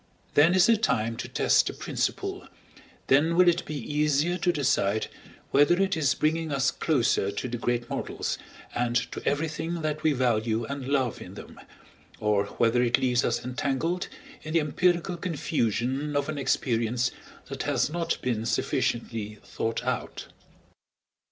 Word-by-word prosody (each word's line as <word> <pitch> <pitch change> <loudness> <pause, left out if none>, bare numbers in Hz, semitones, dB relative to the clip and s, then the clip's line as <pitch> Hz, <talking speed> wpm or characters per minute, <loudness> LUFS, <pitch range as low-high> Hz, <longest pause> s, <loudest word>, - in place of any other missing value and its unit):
Then 160 +5 +5
is 185 - +6
the 230 -1 +5
time 115 - 0
to - - -5
test - - +3
a - - -7
principle, - - -3 0.6
then 155 +5 +3
will 180 +1 +5
it 175 0 +4
he 155 - -4
easier 150 +4 +1
to 175 - +2
decide 110 - +1 0.4
whether 145 +6 +4
it 195 0 +2
is 145 -5 +2
bringing 160 +1 0
us 140 -1 +2
closer 125 -9 +1
to 100 +5 -4
the 120 -1 -4
great 120 0 -1
models - - -3 0.3
and 120 0 -1 0.2
to - - -6
everything 160 +3 -1
that 155 0 -2
we 155 -1 +3
value 115 -3 +1
and 140 +1 -5
love 135 -4 0
in - - -9
them, - - -11 0.6
or 105 -1 +2
whether 120 +1 +3
it 120 -1 +3
leaves 125 -1 +1
us - - -1
entangled 140 +7 -1 0.3
in 155 - -6
the - - +6
empirical 175 +3 +1
confusion 145 - -1
of 145 +1 0
an 155 -2 -3
experience 120 -2 0 0.3
that - - -6
has - - 0
not 170 0 -1
been 115 -3 -1
sufficiently 110 -3 -1
thought 115 0 -3
out. - - -3
140 Hz, 155 wpm, -27 LUFS, 120-160 Hz, 0.6 s, is